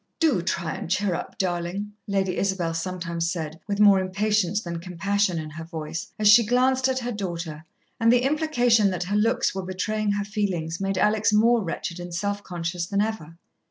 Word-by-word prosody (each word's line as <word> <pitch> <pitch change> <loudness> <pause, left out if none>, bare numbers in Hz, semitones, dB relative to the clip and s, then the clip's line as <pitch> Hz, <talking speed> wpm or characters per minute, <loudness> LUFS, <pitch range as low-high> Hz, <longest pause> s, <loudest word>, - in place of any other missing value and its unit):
"Do 300 - +3
try 170 -2 -2
and - - -6
cheer 195 0 +1
up, 170 - -5
darlin'," 180 +3 -2 0.2
Lady 195 -2 0
Isabel 190 -4 -1
sometimes 170 -1 -2
said, 160 -2 -5
with 200 -1 -2
more 200 -2 +7
impatience 205 +1 +1
than 170 -5 -5
compassion 185 +2 0
in 155 -1 -5
her 160 +2 -7
voice, 160 -1 -6
as 215 - +2
she 215 +3 +8
glanced 255 +3 +2
at 260 -1 0
her 245 -1 -2
daughter; 170 -7 -5 0.4
and 230 0 +4
the 245 0 +4
implication 245 -8 +3
that 180 -2 -2
her 195 +3 -2
looks 230 +4 +2
were 190 - -3
betraying 205 +3 -1
her 205 0 -2
feelings 190 -5 -2
made 195 -1 -1
Alex 210 +2 +3
more 225 +2 +4
wretched 170 0 -4
and 175 -1 -6
self 200 +3 -2
conscious 175 -1 -4
than 200 +1 -1
ever. 205 -7 -2
195 Hz, 190 wpm, -25 LUFS, 170-210 Hz, 0.4 s, she